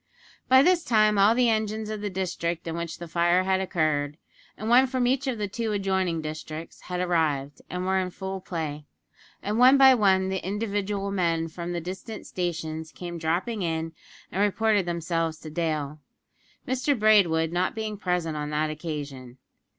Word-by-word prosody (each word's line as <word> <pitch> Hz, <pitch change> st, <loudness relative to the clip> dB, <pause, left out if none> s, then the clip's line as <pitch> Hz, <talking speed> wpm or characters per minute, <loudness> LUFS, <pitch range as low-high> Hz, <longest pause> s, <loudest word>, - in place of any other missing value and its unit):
By 260 Hz, +1 st, +7 dB
this 355 Hz, +1 st, +3 dB
time 215 Hz, -3 st, +3 dB
all 205 Hz, +3 st, +6 dB
the 250 Hz, 0 st, +3 dB
engines 215 Hz, 0 st, -1 dB
of 215 Hz, -1 st, -4 dB
the 205 Hz, -, -2 dB
district 180 Hz, -3 st, -3 dB
in 165 Hz, -1 st, -3 dB
which 170 Hz, -1 st, -4 dB
the 170 Hz, -, -8 dB
fire 175 Hz, +2 st, +2 dB
had 190 Hz, 0 st, +1 dB
occurred, 155 Hz, -5 st, 0 dB, 0.4 s
and 215 Hz, -, -5 dB
one 250 Hz, +3 st, +6 dB
from 255 Hz, -1 st, 0 dB
each 265 Hz, +3 st, +1 dB
of 255 Hz, -3 st, -1 dB
the 210 Hz, -1 st, -2 dB
two 220 Hz, +2 st, -3 dB
adjoining 190 Hz, -5 st, 0 dB
districts, 155 Hz, +1 st, -7 dB
had 180 Hz, 0 st, -3 dB
arrived, 155 Hz, -6 st, 0 dB
and 180 Hz, 0 st, -3 dB
were 190 Hz, 0 st, +2 dB
in 185 Hz, -1 st, -1 dB
full 190 Hz, +1 st, -6 dB
play, 155 Hz, -5 st, -4 dB, 0.6 s
and 210 Hz, +3 st, -1 dB
one 260 Hz, +2 st, +7 dB
by 265 Hz, -1 st, +8 dB
one 190 Hz, -5 st, +3 dB
the 190 Hz, -1 st, -2 dB
individual 200 Hz, 0 st, -2 dB
men 165 Hz, -4 st, 0 dB
from 170 Hz, +1 st, -6 dB
the 175 Hz, -, -2 dB
distant 190 Hz, +6 st, -7 dB
stations 160 Hz, -3 st, -4 dB
came 175 Hz, -1 st, -7 dB
dropping 180 Hz, +8 st, -1 dB
in 165 Hz, -1 st, -2 dB, 0.4 s
and 190 Hz, -, -1 dB
reported 210 Hz, -1 st, +2 dB
themselves 165 Hz, -1 st, -1 dB
to 155 Hz, -, -8 dB
Dale, 155 Hz, -2 st, -2 dB, 0.7 s
Mr 260 Hz, +2 st, +1 dB
Braidwood 185 Hz, -7 st, +4 dB
not 180 Hz, +2 st, 0 dB
being 220 Hz, -1 st, -3 dB
present 180 Hz, -5 st, -1 dB
on 150 Hz, 0 st, -3 dB
that 155 Hz, +1 st, 0 dB
occasion. 145 Hz, -5 st, -6 dB
180 Hz, 175 wpm, -26 LUFS, 160-210 Hz, 0.7 s, by